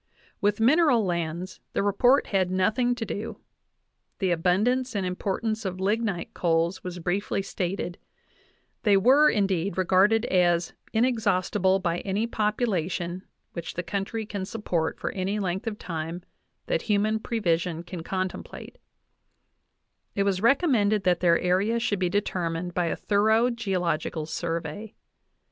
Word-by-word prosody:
With 205 +1 +1
mineral 250 -2 +4
lands 170 +1 -3
the - - 0
report 245 +7 +4
had 190 -3 +1
nothing 220 +7 +1
to 230 - -4
do. 215 +1 -5 0.8
The 190 -2 0
abundance 210 +9 +1
and 195 -2 0
importance 210 +4 -2
of 185 -2 -4
lignite 200 -1 -1
coals 170 +1 0
was 180 -1 -5
briefly 190 +3 -1
stated; 180 -2 -3 0.8
they 205 -3 +4
were, 270 +9 +6
indeed, 195 -3 0
regarded 195 +5 +3
as 175 -2 +2 0.2
"inexhaustible 205 -5 +2
by 175 -2 -1
any 200 +3 -1
population 195 -6 -1 0.3
which 170 -2 -6
the 175 - -2
country 200 +5 -3
can 200 -2 -4
support 180 -6 -2
for - - -2
any 195 +2 -2
length 190 +1 -2
of 210 -2 -3
time 165 0 -5 0.4
that - - 0
human 215 0 +1
prevision 175 -7 -1
can 175 -1 -7
contemplate;" 185 +2 -5 1.4
it 200 - +2
was 195 -2 +1
recom 280 +8 +3
mended 210 -3 +2
that 180 -2 +2
their 170 -2 +4
area 190 +6 +1
should 215 -4 -1
be 180 -1 +1
determined 175 -3 -2
by 175 -1 0
a - - -1
thorough 220 +4 +2
geological 180 -8 -2
survey. 165 +6 -4
195 Hz, 135 wpm, -26 LUFS, 175-220 Hz, 1.4 s, were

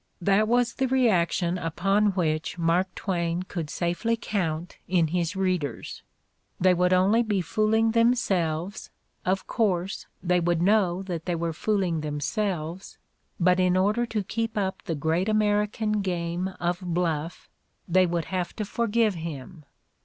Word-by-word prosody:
That 200 +4 +3
was 240 0 +2
the 265 - 0
reaction 185 -8 +2
upon 195 +5 +1
which 160 -2 -1
Mark 170 +2 +2
Twain 170 -2 -1
could 170 -5 -5
safely 175 +9 -1
count 175 -6 -3
in 170 -3 +2
his 175 +2 -1
readers; 180 -9 -2 0.6
they 185 0 +5
would 180 +1 +2
only 190 +5 +4
be 210 -4 0
fooling 215 +5 +2
themselves, 200 -7 +1 0.4
of 190 +1 +1
course, 195 -5 -1 0.2
they 180 0 +2
would 175 -1 +1
know 190 -1 +2
that 175 -4 -5
they 175 - -1
were 165 0 -2
fooling 185 -3 0
themselves: 165 +3 -3 0.4
but 180 +1 +3
in 185 0 +3
order 210 +6 +2
to 215 -3 -2
keep 225 +2 -3
up 190 -2 -1
the 165 - -2
great 160 +7 0
American 210 0 +1
game 175 -1 -2
of 175 0 -1
bluff 170 -2 -2 0.4
they 185 +1 +4
would 170 -1 -1
have 180 -2 -3
to 215 - -3
forgive 230 0 +1
him! 160 -1 -7
185 Hz, 145 wpm, -26 LUFS, 170-210 Hz, 0.6 s, they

